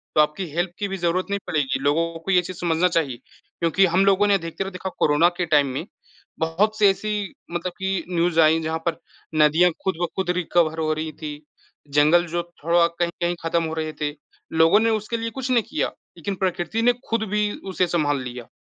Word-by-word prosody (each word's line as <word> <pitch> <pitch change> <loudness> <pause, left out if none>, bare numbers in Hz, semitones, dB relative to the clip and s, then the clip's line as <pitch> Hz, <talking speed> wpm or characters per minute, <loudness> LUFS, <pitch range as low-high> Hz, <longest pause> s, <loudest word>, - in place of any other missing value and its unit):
तो 155 - +7
आपकी 150 +5 0
हेल्प 175 +1 0
की 200 - -1
भी 195 0 -4
ज़रूरत 175 +1 0
नहीं 200 0 -1
पड़ेगी। 135 -5 0
लोगों 165 +4 +1
को 195 +4 -3
ये 180 -1 +5
चीज़ 180 0 -8
समझना 170 +1 +2
चाहिए 155 -8 0 0.4
क्योंकि 175 +3 +3
हम 185 +3 +3
लोगों 195 +1 +4
ने 200 - +4
अधिकतर 190 +1 -2
देखा 190 0 -5
कोरोना 150 +4 +4
के 180 - 0
टाइम 145 -3 +3
में 155 +7 -4 0.5
बहुत-सी 205 +7 +1
ऐसी 205 0 -1 0.2
मतलब 175 +1 -3
कि 190 -3 -1
न्यूज़ 170 -1 +1
आईं 160 +1 +4
जहाँ 160 +1 -1
पर 165 - -1 0.4
नदियाँ 165 +4 +4
खुद-ब-खुद 180 0 -2
रिकवर 165 -2 +1
हो 155 -1 0
रही 155 0 -4
थीं, 150 -1 -5 0.5
जंगल 155 +4 +5
जो 170 +1 -2 0.2
थोड़ा 170 +1 +4
कहीं-कहीं 175 +1 -2
ख़त्म 165 0 +1
हो 160 0 -3
रहे 155 -1 -3
थे। 145 0 0 0.4
लोगों 165 +6 +5
ने 225 0 +2
उसके 220 +1 -1
लिए 230 0 -3
कुछ 265 +1 -5
नहीं 235 -3 +3
किया, 310 - 0 0.3
लेकिन 200 -1 -3
प्रकृति 185 +3 -1
ने 245 +1 +4 0.2
खुद 230 -1 +1
भी 210 0 +1 0.2
उसे 180 -1 +2
संभाल 145 -5 +1
लिया। 125 -2 -7
175 Hz, 195 wpm, -23 LUFS, 160-195 Hz, 0.5 s, तो